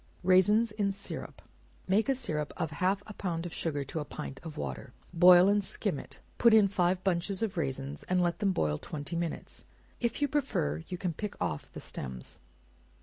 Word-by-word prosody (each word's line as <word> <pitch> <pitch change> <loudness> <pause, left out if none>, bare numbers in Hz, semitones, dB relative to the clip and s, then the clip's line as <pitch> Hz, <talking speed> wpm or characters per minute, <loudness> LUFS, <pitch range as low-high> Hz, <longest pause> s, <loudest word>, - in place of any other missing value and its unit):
Raisins 205 +5 +5
in 205 -2 0
Syrup. 195 0 -6 0.4
Make 210 +7 +2
a 270 - +3
syrup 155 - -3
of 160 -3 -2
half 185 +6 0
a 210 - -9
pound 175 -4 -3
of 170 - -5
sugar 145 -4 -2
to 140 +4 -4
a - - -2
pint 145 -2 -7
of 160 -3 -8
water, 65 -3 -5 0.2
boil 180 +1 +8
and 205 0 +3
skim - - -2
it; - - -10 0.2
put 235 -2 +7
in 210 -2 +6
five 185 -1 +1
bunches 190 +2 0
of 215 -2 -2
raisins, 135 -3 -2
and 185 0 +3
let 175 -1 +1
them 200 -2 +2
boil 75 - 0
twenty 150 +2 -5
minutes; 170 -1 -4 0.4
if 235 -1 -1
you 290 - +2
prefer, 165 - -1
you 180 - -4
can 175 -1 -2
pick 210 +6 -6
off 80 -5 -3
the - - -8
stems. 65 -2 -6
180 Hz, 195 wpm, -30 LUFS, 150-200 Hz, 0.4 s, boil